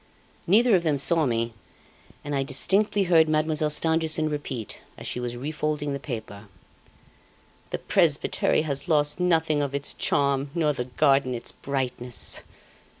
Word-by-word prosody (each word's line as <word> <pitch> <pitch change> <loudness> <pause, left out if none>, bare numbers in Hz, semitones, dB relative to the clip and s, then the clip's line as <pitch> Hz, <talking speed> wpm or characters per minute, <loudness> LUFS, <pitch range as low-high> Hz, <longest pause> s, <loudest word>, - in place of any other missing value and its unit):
"Neither 220 +4 +5
of 180 - +3
them 155 -4 0
saw 160 +2 +3
me, 115 -1 -1 0.7
and 145 - -4
I 140 - +1
distinctly 195 +10 +2
heard 165 -3 +4
Mademoiselle 155 0 +1
Stangerson 160 0 +1
repeat, 130 -7 -5 0.2
as - - -10
she - - -2
was 120 0 -4
refolding 150 +1 -2
the 140 - -3
paper: 110 -6 -7 1.2
'The - - -2
presbytery - - +1
has 140 0 -3
lost 150 -1 +1
nothing 160 -4 +2
of 140 -1 -2
its 140 0 0
charm, 140 0 0
nor 155 -3 +2
the 125 -3 -4
garden 135 0 +2
its 115 - -6
brightness! 125 -3 -3
145 Hz, 145 wpm, -25 LUFS, 130-160 Hz, 1.2 s, Neither